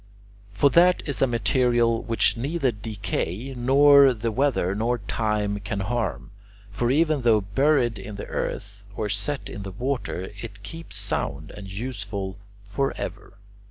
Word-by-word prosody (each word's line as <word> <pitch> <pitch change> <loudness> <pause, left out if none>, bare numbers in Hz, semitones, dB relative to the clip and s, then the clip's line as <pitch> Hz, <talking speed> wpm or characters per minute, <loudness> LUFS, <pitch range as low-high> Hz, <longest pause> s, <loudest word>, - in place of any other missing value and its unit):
For 120 +8 +3
that 180 +3 +5
is 145 - -3
a 135 - +5
material 120 0 +2
which 115 -1 +2
neither 135 +2 0
decay, 105 +2 -4
nor 135 +1 +6
the 115 +1 -2
weather, 120 -6 +1
nor 115 +4 0
time 105 -1 -1
can 100 0 -4
harm, 110 -2 -2 0.5
but 120 - +2
even 155 +1 +2
though 115 -3 +4
buried 120 +3 +2
in 105 - -8
the 100 - -6
earth 100 0 -4
or 105 - -2
set 105 +9 -3
in 105 - -7
the 100 - -6
water 120 -5 -3
it 105 -3 -9
keeps 165 +10 -8
sound 75 +3 -3
and 95 -2 -9
useful 100 -3 -5 0.2
forever. 105 -2 -4
115 Hz, 145 wpm, -25 LUFS, 100-135 Hz, 0.5 s, nor